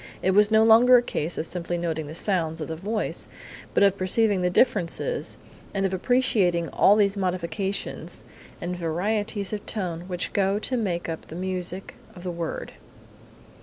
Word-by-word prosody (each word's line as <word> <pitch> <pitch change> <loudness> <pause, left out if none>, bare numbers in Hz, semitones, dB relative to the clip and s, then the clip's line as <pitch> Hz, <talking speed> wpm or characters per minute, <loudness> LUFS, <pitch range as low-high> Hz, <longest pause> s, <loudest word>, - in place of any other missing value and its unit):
It 190 - +3
was 205 +2 +5
no 220 0 +5
longer 235 +3 +7
a - - +4
case 165 -6 -2
of - - -1
simply 175 0 -3
noting 160 -3 -3
the 155 - -8
sounds 165 -4 -1
of 155 - -4
the 160 - -3
voice, 210 +6 -3 0.5
but - - +5
of 200 0 +3
perceiving 200 +1 +2
the 180 - +2
differences 220 - 0 0.4
and 195 0 +1
of 190 - -1
appreciating 190 -6 +2
all 205 - +5
these 200 -1 +2
modifications 185 0 -3 0.4
and 180 +1 -3
varieties 200 +5 -1
of 210 - -4
tone 175 -5 -3
which 180 -1 -3
go 195 0 +2
to 255 +4 -2
make 185 -8 -1
up 165 -1 -6
the 160 - -9
music 185 +1 -3 0.2
of 175 - -11
the 180 - -3
word. 170 -1 -5
185 Hz, 170 wpm, -25 LUFS, 170-210 Hz, 0.5 s, longer